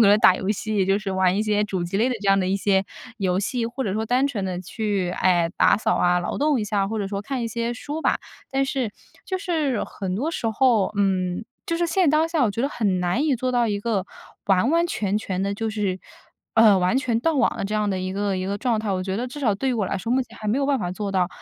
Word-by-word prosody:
能 205 - +7
打 185 - +6
游 190 - -4
戏， 210 -2 0
就 195 +1 +3
是 210 -2 -4
玩 190 -1 +2
一 210 - +1
些 210 -1 +1
主 190 -3 -3
机 175 +3 -3
类 225 +5 +2
的 255 - -1
这 200 - 0
样 195 0 +5
的 185 - 0
一 190 +1 +1
些 195 -1 +2 0.3
游 185 -4 0
戏， 230 +3 -1
或 245 +3 -4
者 195 - -1
说 220 +1 -1
单 255 +4 +2
纯 215 -8 -3
地 180 -1 -3
去， 200 -1 -2
哎， 175 -2 +2
打 - - +5
扫 215 - 0
啊、 180 0 +3
劳 175 - -3
动 290 -3 +2
一 - - -1
下， 205 -2 0
或 220 +1 -3
者 200 -2 -2
说 200 0 -3
看 255 +3 -3
一 230 - -2
些 235 +1 -2
书 295 +6 -5
吧。 - - +1 0.3
但 270 0 +1
是 265 -5 -2 0.3
就 375 - -2
是 315 - -1
很 190 -2 -5
多 275 +11 -1
时 280 - -3
候 225 -2 +2
嗯， 185 -1 0 0.2
就 335 - -1
是 345 0 +1
现 340 0 +2
当 310 +2 +3
下， 325 -5 +2
我 215 - +2
觉 230 +5 -3
得 280 - +1
很 200 -9 0
难 180 - 0
以 295 - +2
做 255 +1 -1
到 245 -1 +2
一 205 -2 -1
个 205 -4 -1 0.4
完 195 +5 +3
完 335 +1 +3
全 210 - -1
全 190 -3 -3
的 200 0 -1
就 225 +2 -2
是 205 -4 -2 0.6
呃， 220 -3 +7
完 180 +6 +2
全 240 -4 0
断 320 +1 +1
网 - - +2
的 - - -3
这 200 - -4
样 210 -1 +1
的 190 -2 -1
一 185 0 -3
个 200 -1 -1
一 185 - -3
个 200 +1 -2
状 235 0 0
态。 215 -2 -3
我 185 -1 0
觉 190 +1 -3
得 240 +4 -2
至 275 - -9
少 235 -8 +1
对 265 +7 -2
于 - - +1
我 215 -5 0
来 - - -2
说， 225 +5 -5
目 265 - +3
前 - - -15
还 215 - -4
没 220 - +2
有 280 - 0
办 280 -1 +2
法 175 - -3
做 200 +2 -4
到， 180 -2 +2
210 Hz, 305 characters per minute, -23 LUFS, 195-250 Hz, 0.6 s, 能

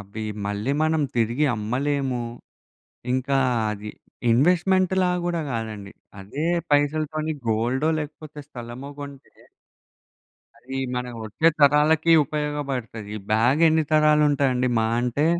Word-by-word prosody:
అవి 100 +3 -7 0.2
మళ్ళీ 105 +6 -2
మనం 155 -1 +2
తిరిగి 120 +6 +1
అమ్మలేము. 130 +4 -1 0.9
ఇంకా 130 +2 0 0.3
అది 105 0 -6 0.4
ఇన్వెస్ట్‌మెంట్‌లా 180 +7 +3 0.2
గూడా 175 -1 -1
కాదండి, 110 -3 -5 0.3
అదే 135 +11 -5 0.3
పైసలతోని 155 +2 +1 0.2
గోల్డో 120 +7 +1
లేకపోతే 150 0 -8
స్థలమో 125 0 -8
గొంటే 140 -1 -10 1.3
అది 130 +3 -7 0.2
మన 125 0 -2 0.2
వచ్చే 110 +10 +1
తరాలకి 150 +3 +4
ఉపయోగపడతాయి. 140 -7 -4
ఈ - - -3
బ్యాగెన్ని 155 +8 +4
తరాలుంటదండి, 145 -4 +3
మహా 110 0 +1
అంటే 125 +5 0
140 Hz, 100 wpm, -24 LUFS, 115-155 Hz, 1.3 s, తరాలకి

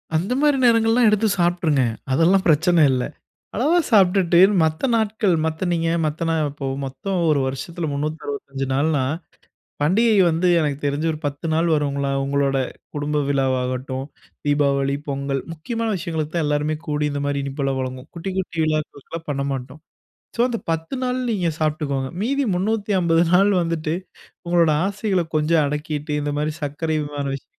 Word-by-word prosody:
அந்த 180 +9 0
மாதிரி 295 -2 +4
நேரங்கள்லாம் 230 0 +4
எடுத்து 215 +1 +2
சாப்பிட்டுருங்க. 170 -5 +2 0.3
அதெல்லாம் 170 +7 +3
பிரச்சனை 170 +2 +4
இல்ல. 125 -1 0 0.5
அளவா 300 +10 +3
சாப்பிட்டுட்டு, 185 -4 +4 0.2
மத்த 155 0 -1
நாட்கள் 220 -3 +1
மத்த 160 +3 -2
நீங்க 165 -1 0 0.2
மத்த 155 +2 -2
நாள் 160 -2 +1
இப்போ 140 -1 -6 0.2
மொத்தம் 180 +8 -3
ஒரு 150 -2 +3
வருஷத்துல 160 +5 -4
365 140 -2 -4
நாள்னா, 145 0 +1 0.8
பண்டிகை 210 +7 +3
வந்து 165 +3 +1
எனக்கு 145 -3 0
தெரிஞ்சு 145 +3 0
ஒரு 155 - -7
10 145 +3 -4
நாள் 165 +2 +2
வருங்களா. 140 -2 -1
உங்களோட 140 0 +1 0.4
குடும்ப 145 0 0
விழாவாகட்டும், 130 -1 -1 0.4
தீபாவளி, 140 -1 +2
பொங்கல் 140 -1 -2
முக்கியமான 225 +8 -3
விஷயங்களுக்கு 160 -3 -4
தான் 165 -2 +1
எல்லோருமே 150 +1 0
கூடி 150 0 0
இந்த 145 0 -3
மாரி 145 0 -1
இனிப்பல்லாம் 135 -1 -2
வழங்குவோம். 130 +1 -5
குட்டி, 170 +3 -4
குட்டி 180 -2 -3
விழாக்களுக்கலாம் 155 +1 -4
பண்ண 140 0 -2
மாட்டோம். 135 +3 -6 0.6
ஸோ - - -2
அந்த 235 -2 -2
10 165 +6 -2
நாள் 250 0 0
நீங்க 185 -6 0
சாப்பிட்டுக்கோங்க. 150 -4 -1
மீதி 275 +6 0
350 190 -4 +1
நாள் 190 +3 +5
வந்துட்டு 165 -1 -2 0.5
உங்களோட 170 -2 +3
ஆசைகள்ல 200 -2 0
கொஞ்சம் 155 +1 +3
அடக்கிட்டு, 150 +1 -3
இந்த 145 0 -2
மாரி 150 +1 0
சர்க்கரை 155 +3 -2
அபிமான 145 -1 -4
விஷயங்கள், 135 - -10
155 Hz, 150 wpm, -22 LUFS, 140-180 Hz, 0.8 s, நாள்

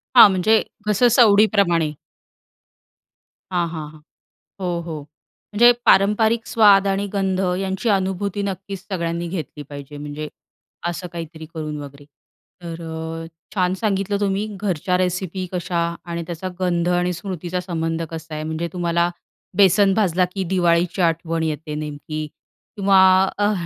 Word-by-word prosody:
हां, 235 -4 +10
म्हणजे 190 +4 +3 0.3
जसं 215 +4 +4
सवडीप्रमाणे. 200 - +4 1.6
हां, 175 -2 +1
हां, 160 -2 -6
हां, 155 -1 -16 0.6
हो, 175 -2 -1
हो. 160 -3 -5 0.5
म्हणजे 240 +3 +7
पारंपरिक 220 +3 +4
स्वाद 200 -3 +5
आणि 195 +1 0
गंध 190 -2 0 0.2
यांची 195 +4 -2
अनुभूती 195 0 0
नक्कीच 195 0 -5
सगळ्यांनी 170 -1 -2
घेतली 160 -4 -6
पाहिजे 145 0 -9
म्हणजे 145 +1 -6 0.6
असं 175 +1 -4
काहीतरी 160 -1 -7
करून 155 -2 -4
वगैरे, 140 0 -11 0.6
तर 170 0 -6
अ, 160 0 -5 0.3
छान 180 -2 +2
सांगितलं 200 -1 -1
तुम्ही 200 0 0 0.2
घरच्या 180 -2 0
रेसिपी 185 0 -2
कशा 180 -1 -2 0.3
आणि 170 -1 -4
त्याचा 175 +2 -5
गंध 175 -1 +1
आणि 180 0 +1
स्मृतीचा 180 0 -4
संबंध 165 -2 -2
कसा 160 -1 -7
आहे? 155 - -4
म्हणजे 160 +2 -3
तुम्हाला 170 -1 +1 0.5
बेसन 195 0 +5
भाजला 185 -3 +2
की 195 - -1
दिवाळीची 175 0 +2
आठवण 165 -1 0
येते 155 -1 -3
नेमकी 150 0 -5 0.5
किंवा 195 -1 +4 0.4
अ, 205 +1 +2
180 Hz, 130 wpm, -21 LUFS, 165-195 Hz, 1.6 s, हां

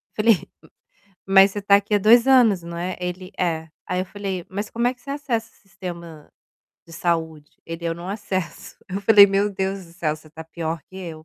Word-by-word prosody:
Falei: 215 -2 +3 0.8
"Mas 195 0 +6
você 205 - -4
está 200 0 +5
aqui 200 +1 0
há - - +5
2 230 +5 +5
anos, 235 -9 +5
né?" 170 +2 -4
Ele: 180 +1 -5
"É". 160 -3 -1 0.2
Aí, 180 0 -2
eu - - -4
falei: 190 -3 -5
"Mas 205 +2 -4
como 235 +1 0
é 250 - 0
que 250 - -28
você 275 - -12
acessa 240 -6 -3
o - - -29
sistema 170 -5 -9 0.5
de 165 - -14
saúde?" 160 -2 -2 0.2
Ele: 165 0 -7
"Eu 165 - -1
não 170 +1 -8
acesso". 190 -4 -5
Eu 195 +2 -4
falei: 205 0 +8
"Meu 200 +1 +1
Deus 190 0 -3
do 165 - -18
céu, 155 -3 -2
você 155 0 -17
está 160 +1 -10
pior 165 0 -4
que 190 - -18
eu". 185 -3 -6
190 Hz, 210 wpm, -22 LUFS, 170-205 Hz, 0.8 s, falei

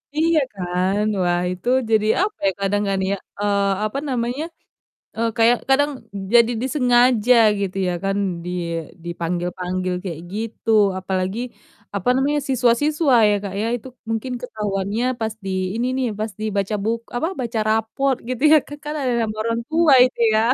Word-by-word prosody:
Iya 320 +1 +3
kan. 185 +1 -1 0.2
Wah, 175 -1 +1
itu 180 +5 -8 0.2
jadi 215 -1 +3
apa 425 +2 -1
ya - - +3
kadang 205 +1 +1
kan 195 -1 0
ya, 200 - +1 0.2
eee, 200 -1 +1 0.2
apa 215 +5 -3
namanya, 245 +3 -1 0.7
eee, 230 +1 +1
kayak 230 +2 +5
kadang 285 +2 +3 0.4
jadi 235 0 +6
disengaja 250 -3 +3 0.2
gitu 195 -1 -3
ya 180 - 0
kan, 195 0 0 0.3
di 175 - -5 0.6
dipanggil-panggil 180 +2 -3
kayak 165 -4 -5
gitu, 225 +1 -5 0.3
apalagi 190 +2 -2 0.6
apa 200 +4 0
namanya, 285 +3 +1
siswa-siswa 270 +4 +2 0.2
ya 205 - +3
Kak 195 -2 -5
ya, 220 - 0
itu 245 - -12 0.2
mungkin 225 +3 -2
ketahuannya 210 -2 -2 0.2
pas 220 -1 -2
di - - -3 0.3
ini 240 +2 0
nih, 260 -2 0
pas 215 0 -2
dibaca 205 -1 -1
buk 230 +2 0 0.2
apa, 320 - 0
baca 235 -2 -2
raport 225 +5 +1
gitu 255 +1 -3
ya, 315 - +9
ka - - -9
kan 300 - -3
ada 255 -2 0
nama 215 -1 -2
orang 230 +1 -1
tua 320 -2 +4
itu 255 - -5
ya. 215 - +4
225 Hz, 160 wpm, -21 LUFS, 195-250 Hz, 0.7 s, ya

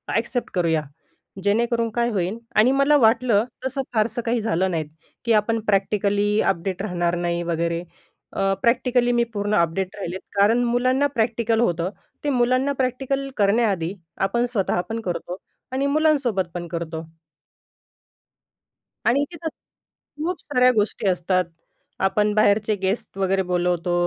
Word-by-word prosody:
Accept 235 +2 -1
करूया, 165 -4 +1 0.6
जेणेकरून 230 +2 +1
काय 235 +2 0
होईल 195 0 -1 0.2
आणि 225 +5 +5
मला 275 +2 +4
वाटलं 230 -3 +4 0.2
तसं 265 +1 -1
फारसं 225 +2 0
काही 230 +1 0
झालं 190 -4 +1
नाहीत 160 -3 -2 0.4
की 235 - +2
आपण 225 +1 +2
प्रॅक्टिकली 205 +1 +1
अपडेट 185 +1 -1
राहणार 175 -4 -1
नाही 175 0 -1
वगैरे. 170 0 -1 0.5
अ, 195 0 +1
प्रॅक्टिकली 245 0 +2
मी 240 0 +3
पूर्ण 205 +1 -1
अपडेट 170 +3 0
राहिले 185 -2 -4 0.2
कारण 220 +5 +4
मुलांना 255 +3 +2
प्रॅक्टिकल 230 -1 +1
होतं. 175 -5 +1 0.3
ते 290 - +1
मुलांना 255 +2 +2
प्रॅक्टिकल 270 +2 -2
करण्याआधी 200 -4 +2 0.3
आपण 235 +4 +1
स्वतःहा 205 -7 0
पण 225 0 -3
करतो 180 -3 -4 0.4
आणि 270 +2 0
मुलांसोबत 280 -9 +2
पण 175 -1 -4
करतो. 165 -1 -4 2.0
आणि 260 +4 +3
इथ 335 -1 -6 0.8
खूप 355 +2 -2
साऱ्या 255 -3 +3
गोष्टी 210 -1 0
असतात. 180 0 +1 0.6
आपण 210 +2 +1
बाहेरचे 215 0 +3
गेस्ट 195 +1 -2
वगैरे 195 0 +1
बोलवतो, 175 -1 0
215 Hz, 130 wpm, -23 LUFS, 185-240 Hz, 2.0 s, आणि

